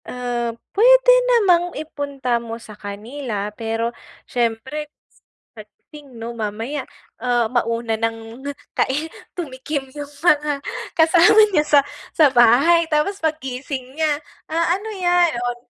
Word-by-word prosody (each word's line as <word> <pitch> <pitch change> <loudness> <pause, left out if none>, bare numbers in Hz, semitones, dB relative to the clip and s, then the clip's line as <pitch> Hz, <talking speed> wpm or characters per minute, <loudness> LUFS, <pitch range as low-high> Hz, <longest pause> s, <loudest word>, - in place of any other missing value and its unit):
Uh, 245 -1 -3 0.2
puwede - - +6 0.2
namang 360 -7 +3
ipunta 280 -6 -3
mo 230 -1 -6
sa 225 -2 -12
kanila, 210 +1 -6
pero 225 +1 -3 0.3
siyempre, 250 +6 -2 0.6
sa 220 - -10
pagdating 265 +5 -16
'no? 230 +1 -6
Mamaya, 225 +6 -4 0.3
uh, 245 -1 +1
mauna 230 -1 0
ng 225 +1 -4 0.3
kai 280 +4 0 0.3
tumikim 280 -3 -4
yung 290 -1 -7 0.2
mga 295 -3 +3 0.4
kasama 330 +4 +5 0.2
niya 300 - +4
sa 295 -1 +5 0.4
sa 300 -5 +5
bahay, 275 +8 +5
tapos 315 +7 0
paggising 265 -4 -4
niya, 305 -1 0 0.3
ah, 335 +2 +1
"Ano 430 +3 -8
yan?" 350 -5 +2
Oh, 245 0 -2
270 Hz, 120 wpm, -21 LUFS, 235-315 Hz, 0.6 s, puwede